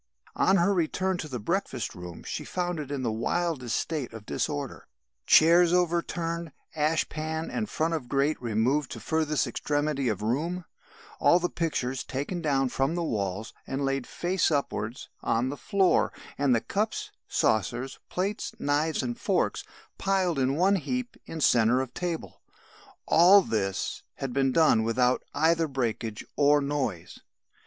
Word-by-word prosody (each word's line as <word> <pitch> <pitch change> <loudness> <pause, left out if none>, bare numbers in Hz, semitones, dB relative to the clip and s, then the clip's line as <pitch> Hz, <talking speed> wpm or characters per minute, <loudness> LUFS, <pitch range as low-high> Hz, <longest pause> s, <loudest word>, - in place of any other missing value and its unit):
On 190 - +4
her 185 +3 +3
return 185 +1 0
to 155 - -4
the 130 -4 -4
breakfast 135 - -2
room 90 -1 -9
she - - -4
found 175 -2 -2
it 145 -3 -5
in 140 -2 -3
the 115 - 0
wildest 125 +2 -1
state 145 -8 -3
of 110 -2 -9
disorder; 145 0 -3 0.4
chairs 170 +2 +6
over 175 -1 +3
turned, 170 -1 -4 0.2
ashpan 160 +1 -1
and 215 -3 -2
front 165 +1 0
of 140 -7 -3
grate 140 +2 +1
removed 120 +5 +1
to - - -7
furthest 155 -2 0
extremity 145 -2 -1
of 105 -1 -2
room, 165 +10 -1 0.5
all 170 - +5
the 175 0 -1
pictures 135 -6 -2
taken 145 +7 -4
down 135 -4 +2
from 135 +6 0
the 175 - -1
walls 100 - -2
and 135 +1 -2
laid 135 -2 -1
face 180 +1 0
upwards 125 -6 -2
on 120 +3 +1
the 140 - -4
floor, 190 +4 +2 0.2
and 140 -3 +3
the 115 - +1
cups, 210 +2 -2 0.2
saucers, 120 +5 0
plates, 195 +4 -2
knives 145 +1 0
and 120 -2 -4
forks - - 0 0.4
piled 185 -6 +1
in 130 +1 +1
one 190 +5 +3
heap 245 - -3
in 165 - -6
centre 120 -3 +4
of 130 -1 -3
table; 175 -2 -4 0.6
all 185 +4 +7
this 95 - -2
had 135 -2 -4
been 135 0 +2
done 155 -7 +4
without 125 +3 +2
either 165 +1 +3
breakage 115 -5 -3
or 145 +1 +5
noise. 140 - -3
145 Hz, 155 wpm, -27 LUFS, 125-170 Hz, 0.6 s, all